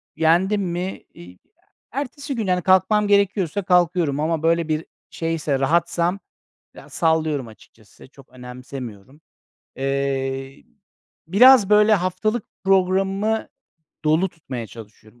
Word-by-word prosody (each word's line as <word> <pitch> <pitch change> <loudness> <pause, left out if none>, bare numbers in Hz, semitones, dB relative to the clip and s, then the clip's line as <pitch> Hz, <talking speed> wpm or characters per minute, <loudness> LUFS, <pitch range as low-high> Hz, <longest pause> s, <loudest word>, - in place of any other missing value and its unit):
yendim 185 +6 +2
mi, 180 +1 -4
iii, 85 +1 -13
ya, 90 - -29 0.3
ertesi 280 +2 -5
gün, 220 -4 -3
hani, 180 -1 +1
kalkmam 190 +3 +3
gerekiyorsa 200 -2 +1
kalkıyorum 175 -5 +2
ama 160 0 -1
böyle 165 0 +2
bir 155 0 -2 0.2
şeyse, 160 -4 -2
rahatsam, 170 +5 0 0.6
ya, - - -14
sallıyorum 155 -6 0
açıkçası. 110 +2 -18
Çok 135 -1 -19
önemsemiyorum. 125 0 -10 0.6
Eee, 135 0 -3 0.6
biraz 210 +3 +6
böyle 210 +1 +5
haftalık 205 +5 -1 0.2
programımı 195 +3 +1 0.6
dolu 160 +5 +2
tutmaya 130 -9 -8
çalışıyorum. 110 +1 -15
170 Hz, 110 wpm, -21 LUFS, 135-195 Hz, 0.6 s, biraz